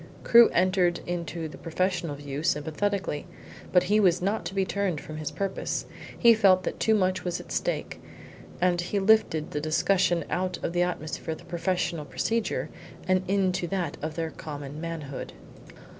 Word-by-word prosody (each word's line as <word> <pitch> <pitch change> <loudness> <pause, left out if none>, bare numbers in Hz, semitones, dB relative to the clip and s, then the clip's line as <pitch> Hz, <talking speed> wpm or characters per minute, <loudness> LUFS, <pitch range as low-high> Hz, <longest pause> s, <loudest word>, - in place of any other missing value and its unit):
Crewe 235 0 +8
entered 180 -1 +2
into 170 -1 -3
the 155 - -11
professional 175 -2 -1
view 145 0 -5
sympathetically, 160 +2 -1 0.4
but 180 -1 +5
he 205 +4 +3
was 180 -4 +4
not 200 +4 -1
to 195 - -5
be 195 -1 +2
turned 190 -5 -1
from 155 +1 -8
his 155 -1 -3
purpose. 195 -1 -3 0.3
He 235 -1 +7
felt 195 -4 +4
that - - -4
too 220 - +3
much 185 -2 +1
was 180 -1 -2
at - - -11
stake, - - -2 0.6
and 175 -1 +2
he 180 +4 -2
lifted 195 -6 +3
the 150 - -2
discussion 170 +2 +2
out 180 0 -1
of 170 - -2
the 175 - +2
atmosphere 160 -2 -2
of 175 - -15
professional 170 -2 -1
procedure 190 - -1 0.4
into 185 -1 +1
that 175 -5 -2
of 155 +1 -4
their 165 -1 -2
common 145 -1 -7
manhood. 160 -5 -5
175 Hz, 160 wpm, -27 LUFS, 160-190 Hz, 0.6 s, Crewe